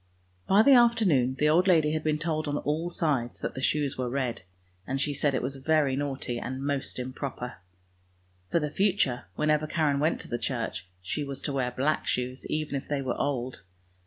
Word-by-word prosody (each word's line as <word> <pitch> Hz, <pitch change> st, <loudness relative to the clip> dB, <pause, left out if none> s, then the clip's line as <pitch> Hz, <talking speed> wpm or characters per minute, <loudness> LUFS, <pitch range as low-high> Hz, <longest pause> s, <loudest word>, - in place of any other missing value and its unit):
By 200 Hz, +3 st, +6 dB
the 275 Hz, -, +7 dB
afternoon 210 Hz, -, +4 dB
the 150 Hz, +3 st, +2 dB
old 170 Hz, +5 st, +4 dB
lady 160 Hz, -5 st, +4 dB
had 155 Hz, 0 st, -1 dB
been 155 Hz, -1 st, +1 dB
told 155 Hz, -1 st, -2 dB
on 145 Hz, 0 st, 0 dB
all 155 Hz, +4 st, -1 dB
sides 140 Hz, -9 st, 0 dB
that -, -, -3 dB
the 130 Hz, -, -6 dB
shoes 145 Hz, -1 st, 0 dB
were 125 Hz, -1 st, -1 dB
red, 130 Hz, -2 st, -2 dB, 0.5 s
and 135 Hz, 0 st, -1 dB
she 145 Hz, +1 st, 0 dB
said 140 Hz, 0 st, +1 dB
it 130 Hz, -, -1 dB
was 135 Hz, +2 st, -3 dB
very 145 Hz, -1 st, +2 dB
naughty 135 Hz, -3 st, -3 dB
and 130 Hz, +2 st, -4 dB
most 140 Hz, -1 st, -2 dB
improper. 125 Hz, -1 st, -5 dB, 0.9 s
For 170 Hz, -, +2 dB
the 150 Hz, -2 st, -2 dB
future, 185 Hz, -10 st, +1 dB
whenever 150 Hz, 0 st, +1 dB
Karen 150 Hz, -3 st, +1 dB
went 155 Hz, +3 st, +1 dB
to -, -, -7 dB
the 120 Hz, -, -3 dB
church, 115 Hz, -5 st, -3 dB, 0.2 s
she 145 Hz, +11 st, -2 dB
was 140 Hz, -1 st, -5 dB
to 145 Hz, -, -3 dB
wear 130 Hz, -2 st, 0 dB
black 135 Hz, +5 st, 0 dB
shoes, 125 Hz, +1 st, -2 dB
even 155 Hz, -1 st, -2 dB
if 135 Hz, -, -3 dB
they 145 Hz, -2 st, -1 dB
were 130 Hz, -2 st, -1 dB
old. 130 Hz, -4 st, -2 dB
145 Hz, 200 wpm, -28 LUFS, 130-155 Hz, 0.9 s, the